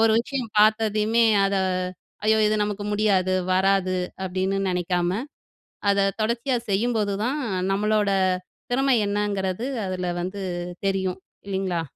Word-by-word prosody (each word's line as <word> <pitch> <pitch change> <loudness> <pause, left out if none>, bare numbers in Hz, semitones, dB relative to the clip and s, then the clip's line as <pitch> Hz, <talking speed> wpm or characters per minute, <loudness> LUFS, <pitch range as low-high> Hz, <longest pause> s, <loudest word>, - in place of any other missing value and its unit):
ஒரு 225 0 +5
விஷயம் 250 -2 -4
பாத்ததையுமே 215 +1 +3 0.2
அத 195 0 0 0.7
ஐயோ 220 0 +4
இது 210 - +2
நமக்கு 205 0 -4
முடியாது, 195 -3 +2 0.2
வராது, 190 0 +2 0.3
அப்டின்னு 190 +1 -1
நெனைக்காம. 180 +2 0 0.7
அத 200 0 +3 0.2
தொடர்ச்சியா 235 +4 0
செய்யும்போது 210 0 +1
தான், 265 +5 -1 0.2
அ - - -1
நம்மளோட 210 +1 +1 0.6
திறமை 265 +1 +3
என்னங்குறது 200 +1 -1 0.2
அதுல 185 -1 -3
வந்து 195 +2 -5 0.4
தெரியும் 190 -1 0 0.3
இல்லிங்களா? 190 -3 -1
200 Hz, 115 wpm, -24 LUFS, 190-220 Hz, 0.7 s, ஒரு